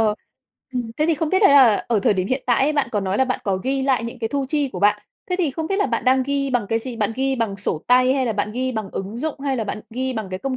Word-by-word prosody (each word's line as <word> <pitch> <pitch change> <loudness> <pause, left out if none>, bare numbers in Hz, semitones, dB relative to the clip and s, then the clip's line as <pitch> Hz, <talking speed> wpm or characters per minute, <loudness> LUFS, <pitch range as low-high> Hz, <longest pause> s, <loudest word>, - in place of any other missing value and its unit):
Ờ, 215 -1 +2 0.6
ừm, 245 -3 -3
thế 305 - +1
thì 330 - +3
không 320 0 -2
biết 375 - +3
đấy 395 - +7
là 260 -7 +6
ở 230 -3 +2
thời 205 - +2
điểm 185 -1 -1
hiện 260 +1 -1
tại 245 +1 +3
ấy, 295 +3 +2
bạn 290 -4 0
có 210 - +1
nói 195 0 -1
là 265 - +4
bạn 255 -1 -2
có 195 -2 0
ghi 265 +7 -1
lại 265 -4 +1
những 235 - -6
cái 225 - -2
thu 280 +3 -1
chi 290 -1 0
của - - -7
bạn, 210 +1 +3 0.3
thế 360 - +1
thì 335 -6 +1
không 315 +4 -4
biết 390 - -1
là 405 - +2
bạn 230 -3 -2
đang 260 +1 +4
ghi 275 +1 -1
bằng 245 -5 0
cái 225 - +1
gì, 240 +1 -7
bạn 215 -1 0
ghi 270 0 0
bằng 225 -5 -2
sổ 180 -5 -3
tay 255 +1 +4
hay 265 -2 0
là 230 - 0
bạn 210 0 -2
ghi 255 +2 -2
bằng 220 -4 -4
ứng 195 +4 -5
dụng 290 +2 -4
hay 275 -1 -1
là 225 - -2
bạn 210 +1 -4
ghi 260 +3 -2
bằng 220 -5 -4
cái 185 - -4
công 265 +4 -3
255 Hz, 330 wpm, -21 LUFS, 215-275 Hz, 0.6 s, đấy